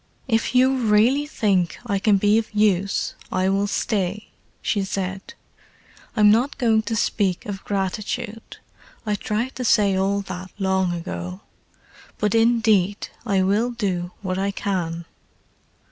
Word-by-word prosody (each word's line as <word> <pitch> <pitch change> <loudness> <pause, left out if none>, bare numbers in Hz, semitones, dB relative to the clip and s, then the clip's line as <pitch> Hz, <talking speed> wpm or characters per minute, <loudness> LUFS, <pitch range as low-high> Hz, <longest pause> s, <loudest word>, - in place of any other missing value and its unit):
"If 225 0 0
you 260 +1 +5
really 240 +5 +3
think 195 - 0
I 200 -4 0
can 205 0 +4
be 205 +3 +4
of 225 - -6
use 200 -2 +1 0.2
I 185 0 +1
will 200 +1 +1
stay," 205 -1 -2 0.3
she 200 -2 0
said. 195 - -4 0.8
"I'm 210 -2 +6
not 245 +7 +2
going 225 -4 +3
to 225 - -1
speak 195 -4 0
of 195 -2 -6
gratitude—I 210 +2 -5
tried 215 +5 -2
to 255 - -3
say 205 -5 +3
all 195 +1 +1
that 185 -1 -7
long 190 -2 +1
ago. 90 - -5 0.8
But 210 -1 0
indeed 225 -4 +2 0.2
I 195 -3 +2
will 205 +6 +2
do 190 -7 -2
what 185 -1 -2
I 195 +1 0
can." 170 -4 -3
205 Hz, 135 wpm, -23 LUFS, 190-225 Hz, 0.8 s, I'm